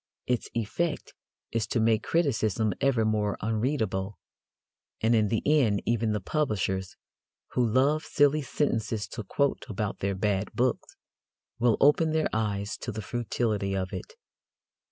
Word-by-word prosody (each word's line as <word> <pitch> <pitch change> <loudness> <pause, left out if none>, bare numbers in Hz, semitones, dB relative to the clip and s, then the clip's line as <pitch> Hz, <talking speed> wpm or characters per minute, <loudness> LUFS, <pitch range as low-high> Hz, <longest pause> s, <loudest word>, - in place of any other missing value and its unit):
Its 125 -2 -1
effect 150 +9 -2 0.4
is 115 -2 -1
to 120 - 0
make 110 -1 +3
criticism 110 - +1
ever 125 -5 +3
more 105 -2 0
unreadable, 110 -4 -1 0.8
and 115 +2 +2
in 110 -2 +4
the 110 +2 -1
end 130 -9 +3
even 115 -1 +1
the 105 - 0
publishers, 95 - -1 0.6
who 125 - +1
love 135 +7 +2
silly 145 0 +3
sentences 115 -6 -1
to 115 - -6
quote 140 +8 0
about 105 -1 -3
their 100 0 -1
bad 100 0 0
books, 125 +1 -1 0.6
will 120 -1 +3
open 155 +3 +4
their 160 -1 +1
eyes 105 -2 -1
to 120 - -5
the 110 0 -5
futility 110 -3 -1
of 95 -1 -3
it. 450 - -7
110 Hz, 140 wpm, -28 LUFS, 105-135 Hz, 0.8 s, in